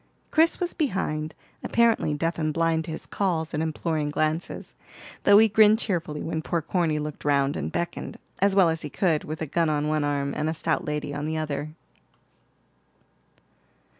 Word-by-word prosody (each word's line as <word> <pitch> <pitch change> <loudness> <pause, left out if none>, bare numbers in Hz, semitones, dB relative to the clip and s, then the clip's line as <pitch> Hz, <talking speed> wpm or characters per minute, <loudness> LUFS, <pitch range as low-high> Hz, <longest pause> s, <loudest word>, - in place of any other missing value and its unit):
Chris 325 +2 +3
was 355 -1 -1
behind, 160 - -2 0.3
apparently 230 -9 +2
deaf 165 +3 -1
and 155 -1 -1
blind 165 -1 +1
to - - -8
his 160 - -6
calls 165 -5 -1
and 155 - -1
imploring 160 -1 -1
glances, 155 +3 -2 0.5
though 205 - +8
he 220 +1 +7
grinned 215 0 +5
cheerfully 175 -9 -2
when 160 -1 -2
poor 170 +1 -1
Corny 165 -1 0
looked 150 0 -5
round 140 -1 +2
and - - -3
beckoned, 170 0 -4 0.2
as 200 0 +3
well 190 -4 +6
as 160 0 -2
he 150 - -5
could, 160 0 +1
with 155 +1 -5
a - - -1
gun 165 +2 +1
on 150 0 0
one 155 -1 +1
arm 140 -1 -1
and 155 +1 -1
a 160 - -2
stout - - -1
lady 150 -1 -3
on 145 +1 -3
the 160 0 -2
other. 155 0 -4
160 Hz, 180 wpm, -26 LUFS, 150-175 Hz, 0.5 s, though